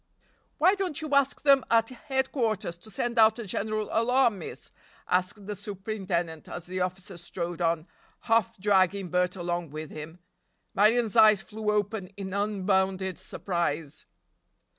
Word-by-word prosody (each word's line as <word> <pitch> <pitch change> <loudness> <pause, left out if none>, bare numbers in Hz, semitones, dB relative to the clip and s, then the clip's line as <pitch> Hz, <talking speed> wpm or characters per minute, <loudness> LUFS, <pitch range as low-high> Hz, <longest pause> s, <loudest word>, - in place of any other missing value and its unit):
"Why 365 +5 +5
don't 385 -7 -2
you 310 -2 -5
ask 280 -1 +2
them 275 -2 +6
at 225 -1 +3
headquarters 255 -7 -1
to 175 +6 -13
send 235 +3 -1
out 220 0 +6
a 235 - -5
general 215 +2 -2
alarm, 235 -2 +3
miss?" 165 - -8 0.4
asked 185 +3 0
the 210 - -4
superintendent 190 -5 -4
as 175 - -6
the 185 +1 -4
officer 185 0 -3
strode 175 0 -5
on, 165 -1 +1 0.4
half 230 0 +1
dragging 190 -1 +2
Bert 180 +1 +1
along 175 -2 -3
with 155 +1 -7
him. 155 +2 -8 0.6
Marion's 225 +2 +3
eyes 215 -3 +6
flew 215 0 -4
open 210 -1 0
in 190 -2 -5
unbounded 190 -2 0
surprise. 165 -5 -3
200 Hz, 140 wpm, -28 LUFS, 180-225 Hz, 0.6 s, them